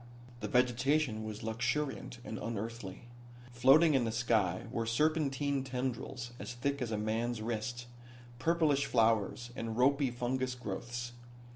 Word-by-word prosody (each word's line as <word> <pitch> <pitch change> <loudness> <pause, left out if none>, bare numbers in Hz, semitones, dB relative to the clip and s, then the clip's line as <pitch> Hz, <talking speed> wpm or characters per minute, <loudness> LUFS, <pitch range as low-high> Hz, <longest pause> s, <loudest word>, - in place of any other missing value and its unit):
The - - -3
vegetation 125 -1 +2
was 110 -1 -6
luxuriant, 125 +4 -1
and 110 - -5
unearthly. 115 -3 -5 0.5
Floating 135 +7 +6
in 135 -3 +3
the 115 - 0
sky 110 -6 +1
were 115 -2 -1
serpentine 140 +1 +1
tendrils 125 -1 -3
as - - -6
thick 140 +3 -1
as 120 - -1
a 110 - 0
man's 110 +2 -1
wrist, 115 +2 -3 0.5
purplish 155 -2 +2
flowers 115 +1 +2
and 115 -3 -4
ropy 140 +2 +4
fungus 125 +1 -1
growths. 120 +1 -5
120 Hz, 130 wpm, -33 LUFS, 115-135 Hz, 0.5 s, Floating